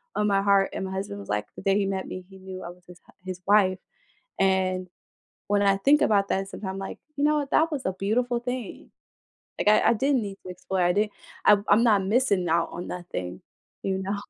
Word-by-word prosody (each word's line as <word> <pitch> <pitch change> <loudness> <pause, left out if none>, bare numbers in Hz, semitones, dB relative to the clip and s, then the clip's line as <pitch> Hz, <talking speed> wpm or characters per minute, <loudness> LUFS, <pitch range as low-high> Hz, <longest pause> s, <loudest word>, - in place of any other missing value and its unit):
on 210 - +1
my 195 -1 +3
heart 200 -1 +3
and - - -3
my 190 - -5
husband 190 - -4
was 100 - -11
like, 105 0 -1
the - - -9
day 195 +1 +2
he 205 - +1
met 190 -1 -2
me, 185 0 -7
he 190 - -13
knew 190 0 -8
I - - -6
was 180 +1 -14
his 180 0 -14
hu - - -21
his 185 -1 -6
wife, 195 -2 +4 0.6
and 185 -1 +1 0.6
when 205 0 +2
I 195 -1 +4
think 280 +9 +4
about 200 -2 +3
that, 195 0 -1
sometimes 195 -1 -5
I'm - - -6
like, 195 - -6 0.2
"You 285 - 0
know 300 0 +3
what, 280 -1 -5
that 325 +1 +3
was 285 -4 -2
a 185 - 0
beautiful 235 +5 0
thing." 250 -2 -6 0.7
Like, - - -2
I 215 - +5
I - - +5
didn't 265 +2 +1
need 200 -1 -6
to - - -6
explore, 185 +1 -2
I 175 0 +3
didn't 210 +2 0 0.3
I'm 205 -1 +5
I'm 215 +3 +5
not 205 -4 +4
missing 200 -6 +2
out 170 +1 +2
on 175 - -6
nothing, 95 - -6 0.4
you 190 -1 -1
know? 195 +2 -2
195 Hz, 235 wpm, -26 LUFS, 185-210 Hz, 0.7 s, I